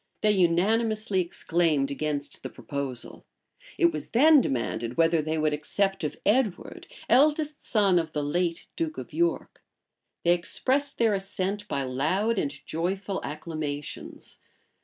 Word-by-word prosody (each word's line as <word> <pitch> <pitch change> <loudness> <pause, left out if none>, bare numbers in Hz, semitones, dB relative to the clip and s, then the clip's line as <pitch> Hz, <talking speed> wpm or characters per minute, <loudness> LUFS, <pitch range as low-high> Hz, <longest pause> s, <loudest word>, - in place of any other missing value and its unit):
They 210 - +4
unanimously 205 +3 +2
exclaimed 165 -5 0
against 145 0 -3
the - - -6
proposal. 140 -4 -5 0.5
It 340 -1 +4
was - - -6
then 295 +4 +6
demanded 120 - -2
whether 165 -1 +4
they 155 +1 -2
would 155 -1 +1
accept 195 +6 -1
of 150 - -3
Edward, 215 -2 0 0.2
eldest 300 +1 +3
son 200 -6 +3
of 160 -2 -3
the 150 - -1
late 170 +3 -1
duke 320 -2 -3
of - - -8
York. 345 +1 -1 0.6
They 175 - +5
expressed 270 +10 0
their 225 -2 +3
assent 195 +1 -2
by 140 - -1
loud 180 - 0
and 145 - 0 0.2
joyful 190 +4 -2
acclamations. 150 -1 -6
175 Hz, 135 wpm, -27 LUFS, 150-215 Hz, 0.6 s, then